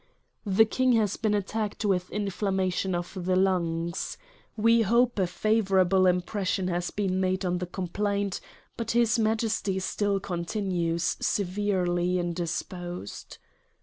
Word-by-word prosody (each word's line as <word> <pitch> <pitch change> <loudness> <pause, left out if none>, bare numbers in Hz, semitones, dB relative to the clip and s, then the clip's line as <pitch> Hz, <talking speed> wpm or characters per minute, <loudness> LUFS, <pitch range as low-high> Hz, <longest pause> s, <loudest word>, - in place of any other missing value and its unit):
" - - -48
The 200 +3 +5
King 255 +3 +2
has 215 -3 +2
been 215 -1 0
attacked 210 +1 -2
with 180 -3 +1
inflammation 190 -2 -1
of 175 0 -4
the 185 +1 +1
lungs. 170 -3 0 0.4
We 230 +2 +4
hope 235 +2 +2
a 185 - +2
favorable 190 -2 +3
impression 185 +1 0
has 175 0 -1
been 190 -2 -1
made 185 0 0
on 180 0 0
the 180 - -4
complaint; 200 +2 -2 0.4
but 230 -1 -4
his 235 0 +3
Majesty 220 -3 0
still 200 +1 0
continues 175 -2 -1
severely 180 -2 0
indisposed. 175 - -4
190 Hz, 125 wpm, -27 LUFS, 180-210 Hz, 0.4 s, The